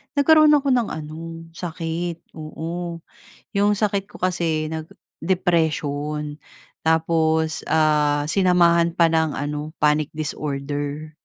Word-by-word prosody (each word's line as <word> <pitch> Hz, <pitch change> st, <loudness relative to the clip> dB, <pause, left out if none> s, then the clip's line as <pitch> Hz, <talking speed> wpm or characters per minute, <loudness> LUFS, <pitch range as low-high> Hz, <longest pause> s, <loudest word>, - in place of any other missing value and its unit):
nagkaroon 305 Hz, +1 st, +6 dB
ako 285 Hz, -1 st, 0 dB
ng 245 Hz, -3 st, +2 dB
ano, 165 Hz, +2 st, -7 dB
sakit. 170 Hz, 0 st, -5 dB
Oo, 165 Hz, +2 st, -5 dB, 0.5 s
'yong 205 Hz, +1 st, +2 dB
sakit 200 Hz, -2 st, 0 dB
ko -, -, -18 dB
kasi 170 Hz, -4 st, 0 dB
nag 160 Hz, 0 st, -5 dB, 0.3 s
depression. 150 Hz, -4 st, -1 dB, 0.5 s
Tapos, 160 Hz, -1 st, +1 dB
ah, 150 Hz, -2 st, +2 dB
sinamahan 170 Hz, -3 st, +3 dB
pa 165 Hz, -1 st, +4 dB
ng 160 Hz, -2 st, +1 dB
ano, 150 Hz, +2 st, -4 dB
panic 150 Hz, 0 st, +2 dB
disorder. 145 Hz, 0 st, -4 dB
160 Hz, 105 wpm, -22 LUFS, 150-175 Hz, 0.5 s, nagkaroon